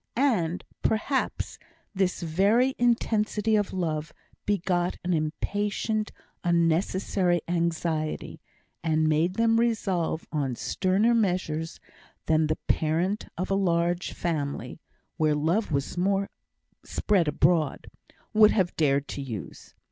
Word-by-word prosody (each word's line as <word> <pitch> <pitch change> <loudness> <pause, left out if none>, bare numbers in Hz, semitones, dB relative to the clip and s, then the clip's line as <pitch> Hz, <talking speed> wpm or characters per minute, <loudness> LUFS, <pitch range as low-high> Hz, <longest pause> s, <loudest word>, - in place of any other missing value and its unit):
And, 205 - +1 0.2
perhaps, 260 +5 -1 0.3
this 190 -3 0
very 205 +11 +3
intensity 220 -2 +2
of 205 -2 +1
love 155 -4 -3 0.3
begot 180 -3 0
an 180 0 0
impatient, 205 +7 -1 0.3
unnecessary 175 +1 +1
anxiety, 165 -2 -2 0.4
and 155 -1 +2
made 160 +4 +2
them 230 0 +3
resolve 195 -9 0
on 140 -5 -1
sterner 200 - +1
measures 180 -7 -1 0.5
than 155 0 +3
the 155 - -1
parent 170 +6 0
of 185 +3 -3
a - - +3
large 175 -2 +1
family 145 -5 -3 0.4
(where 155 -2 +2
love 165 +8 0
was 140 -2 -1
more 195 +2 0 0.5
spread 190 -6 +1
abroad) 150 0 +2 0.5
would 215 -1 +7
have 185 -6 +1
dared 140 -2 +2
to 140 - -4
use. 115 -8 -8
175 Hz, 110 wpm, -27 LUFS, 160-205 Hz, 0.5 s, would